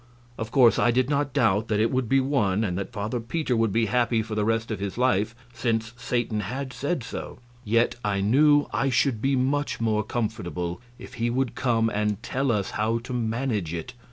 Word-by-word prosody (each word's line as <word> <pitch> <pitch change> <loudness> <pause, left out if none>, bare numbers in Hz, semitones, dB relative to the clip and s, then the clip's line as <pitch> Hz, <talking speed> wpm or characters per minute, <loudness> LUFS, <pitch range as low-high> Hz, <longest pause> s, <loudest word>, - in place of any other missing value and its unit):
Of 110 -1 -5
course 120 -1 +5
I - - +4
did 130 +3 +2
not 145 -1 +1
doubt 110 -5 +2
that 105 -1 0
it 110 +1 +2
would 130 -3 -1
be 135 - +4
won, 115 -7 +1
and 90 -5 -1
that 100 +5 -4
Father 110 +2 -3
Peter 125 +3 -1
would 115 -2 +2
be 115 +3 +2
happy 115 +1 +1
for 110 - -7
the 105 -1 0
rest 115 +1 0
of 105 - -3
his 100 +1 -4
life, 115 -3 +1 0.2
since 115 -1 -1
Satan 120 -2 -1
had 130 +4 -4
said 140 +2 -2
so; 115 - -7 0.3
yet 115 +3 +2
I 100 -2 0
knew 145 +8 +4
I 135 - +1
should 125 -3 +1
be 135 +2 +2
much 140 +3 0
more 110 -2 +1
comfortable 105 -5 -3 0.2
if - - -11
he 120 - +2
would 130 0 0
come 115 -3 +1
and 105 0 -1
tell 135 0 0
us 100 -4 -1
how 110 +2 0
to 120 +2 -7
manage 115 -7 -1
it. 85 +9 -6
115 Hz, 210 wpm, -25 LUFS, 105-130 Hz, 0.3 s, course